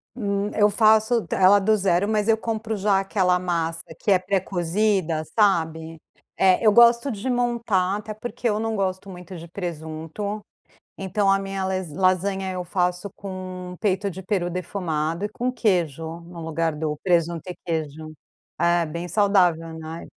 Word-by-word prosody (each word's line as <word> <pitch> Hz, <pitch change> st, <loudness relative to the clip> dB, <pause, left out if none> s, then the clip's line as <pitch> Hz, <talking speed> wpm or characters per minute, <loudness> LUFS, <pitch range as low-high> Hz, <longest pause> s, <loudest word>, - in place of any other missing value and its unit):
Hum, 200 Hz, -3 st, -1 dB
eu 210 Hz, 0 st, +5 dB
faço 220 Hz, +2 st, +3 dB
t -, -, -2 dB
ela 195 Hz, +2 st, +6 dB
do 215 Hz, +2 st, +3 dB
0, 190 Hz, 0 st, +2 dB
mas 215 Hz, 0 st, 0 dB
eu 225 Hz, 0 st, +4 dB
compro 220 Hz, -1 st, -3 dB
já 200 Hz, -1 st, +2 dB
aquela 185 Hz, -2 st, +1 dB
massa 165 Hz, -2 st, -2 dB, 0.2 s
que 205 Hz, -, 0 dB
é 190 Hz, -, +6 dB
pré-cozida, 185 Hz, -2 st, 0 dB
sabe? 160 Hz, -5 st, +1 dB, 0.4 s
É, 190 Hz, +3 st, +3 dB
eu 215 Hz, -, +7 dB
gosto 235 Hz, +4 st, +5 dB
de 220 Hz, +5 st, -4 dB
montar, 235 Hz, -6 st, +1 dB
até 215 Hz, +1 st, -6 dB
porque 240 Hz, +2 st, -3 dB
eu 210 Hz, 0 st, 0 dB
não 225 Hz, 0 st, -1 dB
gosto 190 Hz, -1 st, -2 dB
muito 180 Hz, 0 st, -9 dB
de 170 Hz, -, -10 dB
presunto, 170 Hz, +4 st, -5 dB, 0.6 s
então 195 Hz, +1 st, 0 dB
a 195 Hz, -, +4 dB
minha 195 Hz, -1 st, -4 dB
les 185 Hz, -3 st, -2 dB
lasanha 190 Hz, +1 st, +1 dB
eu 180 Hz, -1 st, -4 dB
faço 180 Hz, +2 st, -1 dB
com 185 Hz, -2 st, -7 dB
peito 200 Hz, -1 st, 0 dB
de 190 Hz, +2 st, -8 dB
peru 185 Hz, -2 st, -1 dB
defumado 170 Hz, -1 st, -2 dB
e -, -, -1 dB
com 245 Hz, +4 st, -2 dB
queijo, 170 Hz, -, -1 dB
no 170 Hz, 0 st, -11 dB
lugar 160 Hz, 0 st, -1 dB
do 150 Hz, 0 st, -2 dB
presunto 170 Hz, -3 st, +1 dB
e 180 Hz, -, -5 dB
queijo. 155 Hz, -1 st, -4 dB, 0.5 s
É, 170 Hz, -1 st, +2 dB
bem 170 Hz, +3 st, -5 dB
saudável, 180 Hz, -6 st, +2 dB
né? 160 Hz, +1 st, -7 dB
185 Hz, 165 wpm, -24 LUFS, 170-205 Hz, 0.6 s, eu